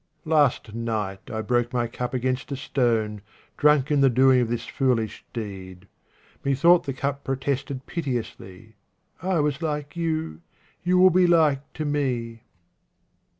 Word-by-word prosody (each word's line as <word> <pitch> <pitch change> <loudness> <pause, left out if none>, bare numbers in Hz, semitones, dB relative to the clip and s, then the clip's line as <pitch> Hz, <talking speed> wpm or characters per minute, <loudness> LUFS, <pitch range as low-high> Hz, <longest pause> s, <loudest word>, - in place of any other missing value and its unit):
Last 145 -8 +2
night 110 -4 -4
I 110 0 -3
broke 120 +1 0
my 120 -1 +1
cup 125 +2 -4
against 130 +2 -2
a - - -1
stone, 115 -6 0 0.3
drunk 150 -1 +3
in 145 -1 +3
the 135 - +6
doing 130 +1 +4
of 120 - -1
this 120 0 -3
foolish 120 -5 -1
deed. 95 -4 -7 0.6
Me 140 0 +1
thought 170 +6 +5
the 140 - -2
cup 140 +1 -3
protested 135 0 -3
piteously, 110 - -5 0.2
" - - -43
I 185 -1 0
was 145 +1 -1
like 150 -2 -3
you; 160 - -2 0.4
you 180 +1 +2
will 185 0 +7
be 180 +1 +4
like 155 -5 +2
to 155 - -4
me." 125 -6 -2
130 Hz, 150 wpm, -24 LUFS, 115-150 Hz, 0.6 s, will